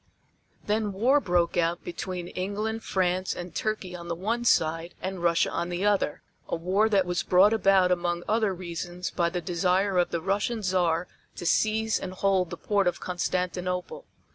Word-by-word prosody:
Then 210 -1 0
war 250 +9 +3
broke 175 -7 +1
out 170 0 +1
between 175 0 -5
England, 210 +4 -3
France 185 0 0
and 175 0 -7
Turkey 210 -4 -3
on 170 -1 -8
the 170 - -2
one 225 +7 -2
side 165 -4 +1
and 190 -1 -4
Russia 170 -1 +2
on 170 +1 -2
the 180 +3 -2
other, 205 -7 +1 0.3
a - - 0
war 190 +6 +1
that 195 -3 +3
was 175 -1 -1
brought 190 +4 +5
about 195 -4 +4
among 175 -1 0
other 215 -1 +2
reasons 175 0 -5
by 170 -1 +1
the 175 +1 -3
desire 180 +3 +1
of 175 - +2
the 170 - -2
Russian 205 +5 -1
Czar 180 -2 +1 0.3
to - - -7
seize 220 +4 +2
and 185 - -6
hold 190 -2 +1
the 175 - -6
port 200 0 +1
of 180 - 0
Constantinople. 180 - -3
185 Hz, 175 wpm, -27 LUFS, 175-200 Hz, 0.3 s, brought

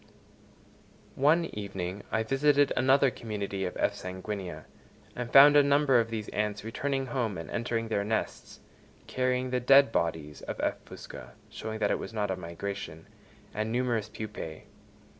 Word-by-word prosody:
One 155 +5 +3
evening 100 -2 -5
I 110 - +1
visited 140 +3 +3
another 135 +1 +4
community 100 -5 -4
of 90 - -5
F. - - +1
sanguinea, 95 0 -6 0.5
and 120 -1 -5
found 145 +2 +9
a 145 - +8
number 140 -2 +4
of 115 -1 0
these 110 -2 -4
ants 105 -1 -2
returning 135 +4 -2
home 120 -6 -2
and 80 - -7
entering 115 -1 -2
their 100 -2 0
nests, 110 +1 -3 0.4
carrying 130 0 -1
the 125 - +1
dead 135 +1 +6
bodies 80 -5 -2
of - - -6
F. - - -1
fusca 60 -1 -10 0.2
(showing 110 0 -5
that 110 - +1
it - - 0
was - - -7
not 105 -2 0
a - - 0
migration) 85 -2 -6 0.5
and 110 +1 -2
numerous 120 -3 0
pupæ. 105 -8 -7
110 Hz, 155 wpm, -29 LUFS, 100-130 Hz, 0.5 s, found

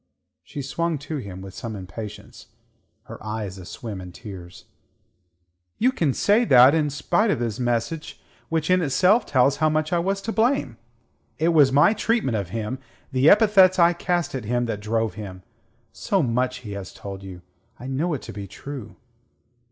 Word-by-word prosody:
She 135 - -7
swung 165 +4 -1
to 145 +2 -5
him 95 -7 -7
with 95 -1 -9
some 115 -1 -6
impatience, 100 +3 -9 0.6
her - - -11
eyes 105 -3 -5
aswim 100 +2 -7
in 90 -1 -9
tears. 90 -3 -11 1.1
"You 250 +4 +3
can 165 - 0
say 210 +4 +3
that, 130 - +7
and 160 -2 +2
in - - -1
spite 150 +10 +1
of - - +1
his 115 -2 -3
message, 120 +6 -2 0.3
which 160 +1 0
in 185 0 +4
itself 180 - +3
tells 135 +1 +3
how 155 +1 +3
much 155 +1 0
I 175 - +3
was 195 +3 -1
to 225 - -2
blame! 220 - +1 0.6
It 160 +2 +2
was 150 -5 +5
my 145 +10 +5
treatment 220 - 0
of 100 -5 -3
him, 115 +5 -4 0.3
the 130 +3 +4
epithets 200 -3 +6
I 170 -1 +5
cast 175 -1 -1
at 130 -5 -4
him 120 +2 0
that 110 -3 -3
drove 110 0 -1
him. 95 -3 -8 0.5
So 195 -4 0
much 125 +1 -1
he 105 -4 -8
has 100 -2 -7
told 100 -1 -8
you. 95 -2 -10 0.4
I 125 - -9
know 150 +5 -1
it 130 - -7
to - - -8
be 100 -1 -7
true." 130 +4 -9
130 Hz, 180 wpm, -24 LUFS, 105-170 Hz, 1.1 s, that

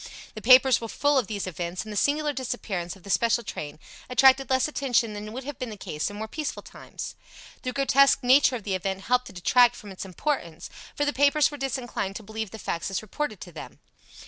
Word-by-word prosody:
The 215 - -8
papers 255 +2 +6
were 230 - -4
full 285 +4 +2
of 235 - -3
these 205 -3 -3
events, 175 0 -4
and 215 -1 -8
the - - -7
singular 295 +6 +1
disappearance 215 -9 -4
of 190 - -18
the 200 - -5
special 235 +4 +2
train 150 -8 -6 0.3
attracted 265 +1 +5
less 260 +1 +2
attention 245 -7 0
than 210 +1 -7
would 255 +4 -6
have 285 0 -7
been 255 - -4
the 215 - -8
case 155 -3 -3
in 205 - -9
more 220 +1 -5
peaceful 300 +6 -5
times. - - -8 0.5
The 255 - -3
grotesque 275 0 +4
nature 260 +1 +5
of 225 - -6
the 195 - -2
event 190 +1 -2
helped 250 +4 +1
to - - -11
detract 240 +6 +4
from 205 -3 -10
its 190 - -7
importance, 185 - -4 0.2
for 290 - 0
the 290 - 0
papers 285 +2 +3
were 290 - -7
disinclined 245 -7 -3
to 220 - -7
believe 220 0 -5
the 220 - -9
facts 170 -4 -3
as 195 +2 -3
reported 215 -1 -4
to 175 - -9
them. 155 - -10
235 Hz, 225 wpm, -26 LUFS, 195-270 Hz, 0.5 s, papers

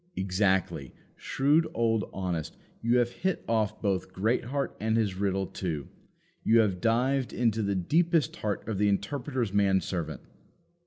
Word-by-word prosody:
Exactly; 95 - 0 0.2
shrewd 150 +4 +2
old 115 -3 +1
Honest; 90 -5 -3 0.2
you 115 +2 +3
have 120 -1 +2
hit 185 +6 -2
off 110 -3 0
both 95 -3 0
Greatheart 120 +7 -1
and 110 +1 +1
his 105 -4 +1
riddle 95 0 0
too. 80 -7 -4 0.5
You 115 - +4
have 95 -5 0
dived 125 +3 +1
into 115 -2 +1
the 100 -1 0
deepest 160 - +2
heart 105 -1 -3
of 110 -4 -2
the 105 0 +3
Interpreter's 120 +2 -1
man 100 -2 +4
servant. 85 -2 -4
105 Hz, 145 wpm, -28 LUFS, 95-120 Hz, 0.5 s, You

